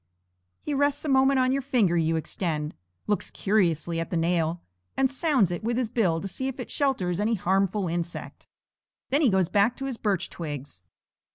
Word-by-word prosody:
he 295 Hz, -, -2 dB
rests 285 Hz, +1 st, +1 dB
a -, -, -2 dB
moment 270 Hz, 0 st, +4 dB
on 255 Hz, 0 st, +3 dB
the 275 Hz, +1 st, +1 dB
finger 240 Hz, -10 st, +2 dB
you 165 Hz, -1 st, +2 dB
extend, 155 Hz, -2 st, -2 dB, 0.3 s
looks 210 Hz, -, -1 dB
curiously 170 Hz, -5 st, +1 dB
at 165 Hz, -, -3 dB
the 175 Hz, -, -1 dB
nail, 165 Hz, 0 st, +1 dB, 0.4 s
and 270 Hz, 0 st, +2 dB
sounds 265 Hz, -, +2 dB
it 175 Hz, -, -4 dB
with 235 Hz, +1 st, 0 dB
his 245 Hz, -4 st, -1 dB
bill 185 Hz, -10 st, +2 dB
to 195 Hz, -, -5 dB
see 260 Hz, +7 st, -4 dB
if 265 Hz, 0 st, -5 dB
it 250 Hz, -, -6 dB
shelters 195 Hz, -, 0 dB
any 220 Hz, +2 st, +1 dB
harmful 195 Hz, +1 st, +1 dB
insect. 170 Hz, 0 st, -5 dB, 0.6 s
Then 285 Hz, +3 st, +3 dB
he 280 Hz, -, +5 dB
goes 190 Hz, -3 st, +2 dB
back 205 Hz, +6 st, +2 dB
to 270 Hz, -, -4 dB
his 265 Hz, -3 st, -3 dB
birch 200 Hz, -5 st, 0 dB
twigs. 145 Hz, -, -7 dB
200 Hz, 190 wpm, -26 LUFS, 170-260 Hz, 0.6 s, he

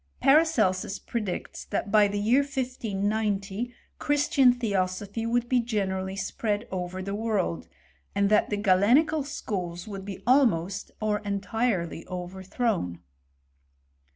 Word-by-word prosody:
Paracelsus 270 Hz, -, +3 dB
predicts 210 Hz, -6 st, -4 dB
that 200 Hz, -, -3 dB
by 210 Hz, -1 st, +6 dB
the 205 Hz, +1 st, -3 dB
year 225 Hz, +6 st, +3 dB
1590 220 Hz, -5 st, -2 dB, 0.3 s
Christian 285 Hz, -3 st, +4 dB
theosophy 205 Hz, -1 st, -2 dB
would 240 Hz, +1 st, +1 dB
be 250 Hz, 0 st, +3 dB
generally 190 Hz, -5 st, -2 dB
spread 210 Hz, +2 st, -2 dB
over 185 Hz, 0 st, -4 dB
the 200 Hz, +1 st, -4 dB
world, 200 Hz, -, -1 dB, 0.5 s
and 200 Hz, 0 st, +3 dB
that 210 Hz, -, +4 dB
the 210 Hz, -, -1 dB
Galenical 225 Hz, +11 st, +4 dB
schools 180 Hz, -10 st, -4 dB
would 195 Hz, -2 st, -6 dB
be 195 Hz, -1 st, -7 dB
almost 200 Hz, -8 st, +2 dB
or 215 Hz, -1 st, 0 dB
entirely 200 Hz, -4 st, -1 dB
overthrown. 185 Hz, -, -2 dB
205 Hz, 115 wpm, -27 LUFS, 190-240 Hz, 0.5 s, by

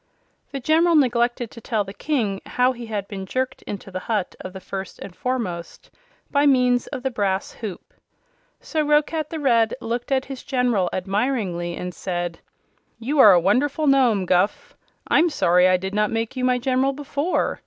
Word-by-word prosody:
The 275 Hz, -, -4 dB
General 325 Hz, +5 st, +3 dB
neglected 240 Hz, -4 st, +2 dB
to 230 Hz, -, -11 dB
tell 220 Hz, -2 st, -1 dB
the 195 Hz, 0 st, -9 dB
King 215 Hz, -9 st, -1 dB
how 250 Hz, +1 st, +2 dB
he 240 Hz, -2 st, -8 dB
had 205 Hz, -3 st, -3 dB
been 195 Hz, -2 st, -7 dB
jerked 260 Hz, +4 st, -2 dB
into 200 Hz, -1 st, -6 dB
the 185 Hz, -, -4 dB
hut 210 Hz, -2 st, -2 dB
of 185 Hz, -, -7 dB
the 190 Hz, -, -8 dB
First 190 Hz, 0 st, -7 dB
and 185 Hz, -2 st, -10 dB
Foremost 215 Hz, -10 st, -4 dB, 0.4 s
by 285 Hz, +1 st, +3 dB
means 250 Hz, -2 st, +3 dB
of 255 Hz, -, -6 dB
the 265 Hz, -, -1 dB
brass 195 Hz, -4 st, -1 dB
hoop. 210 Hz, -6 st, -8 dB, 0.7 s
So 315 Hz, -2 st, -2 dB
Roquat 300 Hz, +1 st, +1 dB
the 325 Hz, -, -5 dB
Red 230 Hz, -5 st, +2 dB
looked 240 Hz, +3 st, -4 dB
at 265 Hz, -1 st, +1 dB
his 270 Hz, -2 st, -7 dB
General 245 Hz, -9 st, +1 dB
admiringly 190 Hz, -3 st, -1 dB
and 180 Hz, 0 st, -5 dB
said: 175 Hz, -1 st, -4 dB, 0.6 s
"You 275 Hz, +6 st, -2 dB
are 210 Hz, -6 st, +9 dB
a 175 Hz, -, +6 dB
wonderful 270 Hz, -, +1 dB
Nome, 250 Hz, -9 st, +3 dB
Guph. 185 Hz, +3 st, 0 dB, 0.3 s
I'm 345 Hz, -, +4 dB
sorry 180 Hz, -, +3 dB
I 185 Hz, 0 st, +4 dB
did 190 Hz, +2 st, -5 dB
not 210 Hz, 0 st, +1 dB
make 225 Hz, +2 st, -2 dB
you 255 Hz, -, -3 dB
my 250 Hz, 0 st, +3 dB
General 260 Hz, +2 st, +1 dB
before. 290 Hz, +4 st, -1 dB
235 Hz, 180 wpm, -23 LUFS, 195-265 Hz, 0.7 s, are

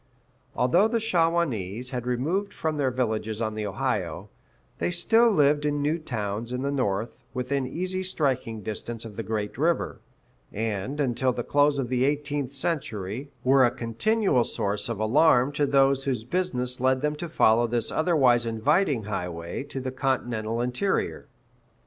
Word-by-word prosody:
[A] -, -, -3 dB
Although 170 Hz, -, +4 dB
the 230 Hz, +1 st, 0 dB
Shawanese 165 Hz, -, 0 dB
had 125 Hz, -2 st, -4 dB
removed 160 Hz, +12 st, -1 dB
from 160 Hz, -1 st, -2 dB
their 140 Hz, -3 st, +1 dB
villages 110 Hz, -4 st, -2 dB
on 110 Hz, -2 st, -1 dB
the 105 Hz, -1 st, -3 dB
Ohio, 100 Hz, -, -2 dB, 0.5 s
they -, -, 0 dB
still 225 Hz, +7 st, +4 dB
lived 145 Hz, -6 st, +3 dB
in 145 Hz, -1 st, 0 dB
new 155 Hz, +3 st, +1 dB
towns 115 Hz, -5 st, -4 dB
in 125 Hz, +1 st, -2 dB
the 140 Hz, -, 0 dB
north, 110 Hz, -5 st, -2 dB
within 130 Hz, +1 st, -1 dB
easy 185 Hz, +6 st, -3 dB
striking 130 Hz, -11 st, -1 dB
distance 115 Hz, +3 st, -5 dB
of 110 Hz, -2 st, -9 dB
the 115 Hz, -, -3 dB
great 110 Hz, +1 st, -3 dB
river; 165 Hz, +3 st, 0 dB, 0.5 s
and, 110 Hz, +5 st, -3 dB
until 130 Hz, -1 st, +1 dB
the 120 Hz, -1 st, -3 dB
close 145 Hz, +2 st, +3 dB
of 130 Hz, -4 st, -2 dB
the 125 Hz, 0 st, +1 dB
eighteenth 145 Hz, -1 st, -1 dB
century, 130 Hz, -, -3 dB
were 135 Hz, +1 st, +5 dB
a 120 Hz, -, +5 dB
continual 125 Hz, -, +1 dB
source 100 Hz, 0 st, -2 dB
of 115 Hz, -3 st, -3 dB
alarm 125 Hz, +3 st, +4 dB
to 145 Hz, 0 st, 0 dB
those 135 Hz, -1 st, +3 dB
whose 125 Hz, -5 st, -1 dB
business 125 Hz, -5 st, -1 dB
led 130 Hz, 0 st, +2 dB
them 150 Hz, 0 st, +1 dB
to 170 Hz, +2 st, -5 dB
follow 120 Hz, -5 st, +4 dB
this 115 Hz, -1 st, -1 dB
otherwise 135 Hz, -8 st, +3 dB
inviting 125 Hz, -, +1 dB
highway 90 Hz, -5 st, -4 dB
to 140 Hz, -1 st, -5 dB
the 130 Hz, 0 st, -4 dB
continental 120 Hz, -4 st, -1 dB
interior. 125 Hz, +11 st, -1 dB
130 Hz, 160 wpm, -26 LUFS, 115-150 Hz, 0.5 s, were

